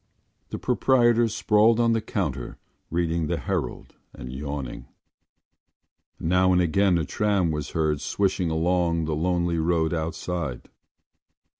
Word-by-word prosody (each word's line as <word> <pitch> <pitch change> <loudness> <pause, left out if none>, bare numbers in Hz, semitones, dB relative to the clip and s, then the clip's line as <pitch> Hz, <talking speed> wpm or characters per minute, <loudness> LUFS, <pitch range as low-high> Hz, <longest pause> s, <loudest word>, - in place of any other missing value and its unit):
The - - -4
proprietor 120 -3 +3
sprawled 110 +1 +3
on 115 -1 +3
the 115 - 0
counter 75 - -3 0.3
reading 85 -1 -1
the - - -1
Herald - - -4 0.2
and 65 0 -8
yawning. 70 -2 -6 1.3
Now 90 +2 +2
and 90 - +4
again 90 +2 +3
a 80 - -1
tram 100 -2 +1
was 75 -1 -4
heard 75 -2 +1
swishing 95 +3 0
along 85 0 +1
the 80 -1 -1
lonely 85 +1 0
road 80 0 +1
outside. 80 -3 -4
85 Hz, 125 wpm, -25 LUFS, 80-100 Hz, 1.3 s, and